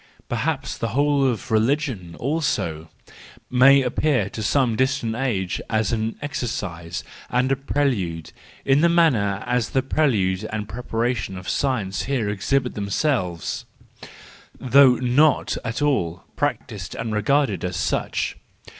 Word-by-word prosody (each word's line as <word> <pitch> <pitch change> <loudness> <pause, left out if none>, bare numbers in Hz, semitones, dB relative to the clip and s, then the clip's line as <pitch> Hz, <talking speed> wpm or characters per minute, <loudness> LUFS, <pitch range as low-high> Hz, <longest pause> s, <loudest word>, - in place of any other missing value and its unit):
Perhaps 135 +4 -2
the 115 +1 -2
whole 145 -1 +3
of 115 -5 -3
religion, 110 - 0
also, 100 - -1 0.6
may 135 +2 +6
appear 125 -4 +1
to 110 - -5
some 120 +1 +2
distant 130 -2 0
age 110 -8 -1
as 110 -1 +1
an 110 0 -1
exercise 90 - -4 0.3
and 125 +2 +1
a - - +4
prelude, 125 - -1 0.3
in 135 +1 +4
like 170 - +5
manner 120 - +2
as 125 -2 0
the 130 - +1
prelude 105 -11 +1
and 105 -1 -3
pre¬ 120 +3 -6
paration 115 -5 -2
of 90 - -9
science 105 -9 -1
here 125 -6 -1
exhibit 125 +6 0
themselves, 100 - -1 0.9
though 130 0 +6
not 130 +4 +2
at 120 +4 -2
all 90 - 0
practised 115 - -3
and 115 -1 -3
regarded 110 - +1
as 90 -1 -2
such. - - -1
120 Hz, 130 wpm, -23 LUFS, 100-140 Hz, 0.9 s, may